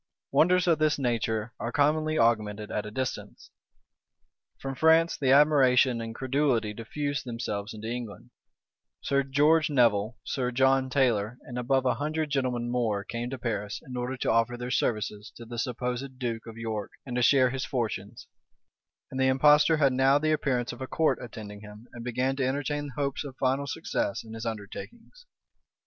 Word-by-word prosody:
Wonders 180 +2 +4
of 165 -3 +3
this 155 -1 +2
nature 115 -3 -1
are 115 +2 -3
commonly 155 +3 +2
augmented 110 -2 +1
at 105 0 -2
a - - -5
distance. 130 +4 -5 1.1
From 135 0 -5
France 160 +4 +4
the 135 - -1
admiration 135 -4 +5
and 115 0 -6
credulity 130 -5 0
diffused 140 +5 -3
themselves 115 -4 -4
into 110 0 -7
England: 115 -3 -6 0.7
Sir 140 0 +1
George 150 +4 +3
Nevil,[*] 115 -4 +2
Sir 125 -3 -2
John 130 +1 +2
Taylor, 125 -4 +1
and 120 - -9
above 130 +2 +1
a 125 - +3
hundred 155 +1 -2
gentlemen 125 -3 -1
more, 110 -5 0
came 115 +4 -4
to 135 - -5
Paris, 105 -4 -3
in 130 - -8
order 125 +2 -3
to - - 0
offer 115 +1 +2
their 125 +1 -5
services 105 -3 -1
to 115 - -10
the 120 0 -6
supposed 125 +2 -3
duke 115 -3 -4
of 115 0 -9
York, 110 -3 -4 0.2
and 125 -3 -5
to 125 - +1
share 130 0 +5
his 130 0 -3
fortunes: 110 -3 -4 0.9
and 130 - -4
the 130 - +3
impostor 150 +4 +5
had 140 -3 +3
now 135 +2 +4
the 155 +1 +1
appearance 130 -5 0
of 120 - -11
a 130 - -4
court 160 +3 +1
attending 105 -3 -9
him, 105 +2 -12
and 120 - -8
began 125 +2 -1
to 135 - 0
entertain 145 +2 -2
hopes 140 0 -1
of 135 -3 -9
final 135 +2 0
success 130 -6 -2
in 110 -1 -11
his 115 +1 -5
undertakings. 225 - -8
125 Hz, 175 wpm, -28 LUFS, 115-140 Hz, 1.1 s, admiration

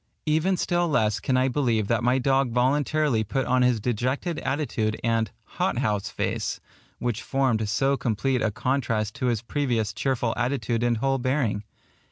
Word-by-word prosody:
Even 160 +5 +2
still 175 0 +1
less 110 -9 +1
can 130 -3 0
I 130 +1 +3
believe 120 -6 +1
that 115 +1 +1
my 125 +2 +3
dog 135 0 +2
voluntarily 135 0 +2
put 130 +5 -1
on 130 0 +2
his 125 -2 +3
dejected 130 - -1
attitude 115 -7 -1
and 115 -2 +1 0.3
"hot - - +1
house 105 0 0
face," - - -2 0.4
which 120 -3 -2
formed 125 -6 0
so 135 +6 +2
complete 125 +1 0
a 110 - +2
contrast 110 -2 -1
to 130 - -1
his 115 -2 0
previous 115 -6 -1
cheerful 120 -1 0
attitude 120 -2 -1
and 120 -1 +2
whole 135 +3 +1
bearing. 125 -5 0
125 Hz, 165 wpm, -25 LUFS, 110-135 Hz, 0.4 s, I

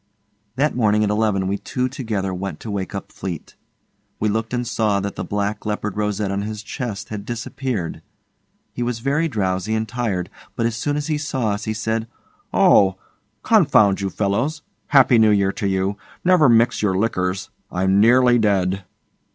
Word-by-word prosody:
That 145 +4 +1
morning 105 -3 +3
at 105 - +1
eleven 105 -3 +1
we 100 +2 -1
two 125 0 -2
together 105 -7 -3
went 95 +2 -5
to 110 - -6
wake 100 -1 -3
up 100 - -6
Fleete. 90 -4 -6 0.7
We 110 - +1
looked 110 +2 -2
and 125 0 -1
saw 110 -4 +1
that 100 0 -4
the - - -4
black 105 +1 -2
leopard 105 -1 -3
rosette 105 -1 -1
on 100 0 -1
his 105 +1 -5
chest 110 -4 -5
had 105 -2 -5
disappeared. 120 -4 -4 0.7
He - - -5
was 120 -1 -1
very 140 +7 0
drowsy 100 - -1
and 110 0 -1
tired, 110 -7 -2 0.2
but 115 - 0
as 115 -1 0
soon 145 +6 -1
as 150 - -2
he 155 -1 -1
saw 135 -6 -1
us, 105 0 -2
he 110 - -2
said, 110 +1 -2 0.4
'Oh! 95 -1 +5 0.5
Confound 140 - +4
you 100 - -1
fellows. 120 +11 -1 0.2
Happy 130 -4 +5
New 110 -1 +6
Year 100 -2 +3
to 100 - -3
you. 95 +1 0 0.3
Never 175 -6 +5
mix 115 +1 +3
your 95 -3 +1
liquors. 95 -2 -1 0.2
I'm 95 +2 +2
nearly 120 +2 +5
dead. 95 -3 +1
105 Hz, 175 wpm, -21 LUFS, 100-120 Hz, 0.7 s, New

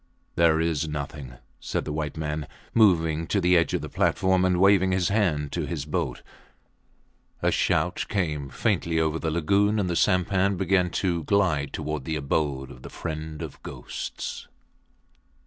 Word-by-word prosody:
There 85 -1 +4
is 80 -2 0
nothing, 70 -3 -6 0.3
said - - -3
the 75 - -3
white 75 -1 -3
man, 75 -2 -3 0.3
moving 80 -7 +3
to 100 - +1
the 90 -1 +3
edge 85 -3 +3
of - - -1
the - - -5
platform 95 -1 +2
and 90 -1 +2
waving 95 -1 +4
his 95 -2 +1
hand 85 -9 +1
to - - -2
his 75 -5 -4
boat. 75 -5 -3 1.2
A - - +3
shout - - 0
came 75 -8 -1
faintly 85 -3 0
over 80 0 0
the 80 - -1
lagoon 100 +7 +2
and 100 -3 0
the 85 - -1
sampan 95 +2 +2
began 90 -1 +2 0.2
to 85 -3 0
glide 85 -8 +1
towards 75 -3 -4
the 80 - -2
abode 70 -2 -1
of 60 - -13
the - - -9
friend 80 -2 -5
of - - -9
ghosts. - - -6
80 Hz, 165 wpm, -26 LUFS, 75-95 Hz, 1.2 s, There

